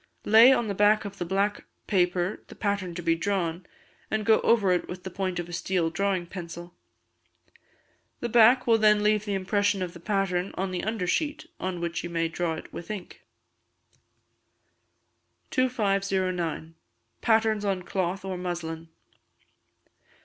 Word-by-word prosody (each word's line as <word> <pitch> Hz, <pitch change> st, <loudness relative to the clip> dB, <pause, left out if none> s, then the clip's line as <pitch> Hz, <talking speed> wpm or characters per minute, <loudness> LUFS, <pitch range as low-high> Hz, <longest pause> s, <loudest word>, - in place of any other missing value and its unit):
Lay 225 Hz, +4 st, +8 dB
on 240 Hz, -4 st, +2 dB
the 200 Hz, -, -1 dB
back 210 Hz, +2 st, +3 dB
of 200 Hz, 0 st, -8 dB
the 175 Hz, -, -2 dB
black 200 Hz, +3 st, 0 dB, 0.2 s
paper 180 Hz, 0 st, 0 dB
the -, -, -12 dB
pattern 200 Hz, -4 st, -2 dB
to 175 Hz, -, -5 dB
be 165 Hz, 0 st, +3 dB
drawn, 175 Hz, -1 st, -2 dB, 0.4 s
and 220 Hz, -1 st, -1 dB
go 220 Hz, -1 st, +5 dB
over 210 Hz, -5 st, +3 dB
it 180 Hz, -, 0 dB
with 180 Hz, 0 st, -8 dB
the 190 Hz, -, -6 dB
point 185 Hz, -1 st, -2 dB
of 175 Hz, -1 st, -3 dB
a 175 Hz, -, -9 dB
steel 175 Hz, -1 st, 0 dB
drawing 195 Hz, -1 st, 0 dB
pencil: 175 Hz, -1 st, -8 dB, 1.5 s
the 240 Hz, -, -2 dB
black 240 Hz, +2 st, +5 dB
will 230 Hz, -1 st, +4 dB
then 210 Hz, -1 st, +4 dB
leave 210 Hz, 0 st, +2 dB
the 205 Hz, -2 st, -1 dB
impression 200 Hz, 0 st, 0 dB
of 175 Hz, -1 st, -5 dB
the 170 Hz, -, -11 dB
pattern 195 Hz, -1 st, -1 dB
on 190 Hz, 0 st, -2 dB
the 180 Hz, -, -2 dB
undersheet, 220 Hz, -, -1 dB
on 185 Hz, -1 st, -3 dB
which 170 Hz, -1 st, -3 dB
you 175 Hz, -, -5 dB
may 165 Hz, -1 st, 0 dB
draw 165 Hz, 0 st, -2 dB
it -, -, -10 dB
with 170 Hz, -, -8 dB
ink. 205 Hz, -4 st, -7 dB, 2.3 s
2509. 195 Hz, -, 0 dB, 0.5 s
Patterns 220 Hz, -2 st, +2 dB
on 195 Hz, -3 st, -1 dB
Cloth 190 Hz, +1 st, -2 dB
or 190 Hz, -1 st, -3 dB
Muslin. 165 Hz, -2 st, -5 dB
190 Hz, 155 wpm, -27 LUFS, 175-210 Hz, 2.3 s, Lay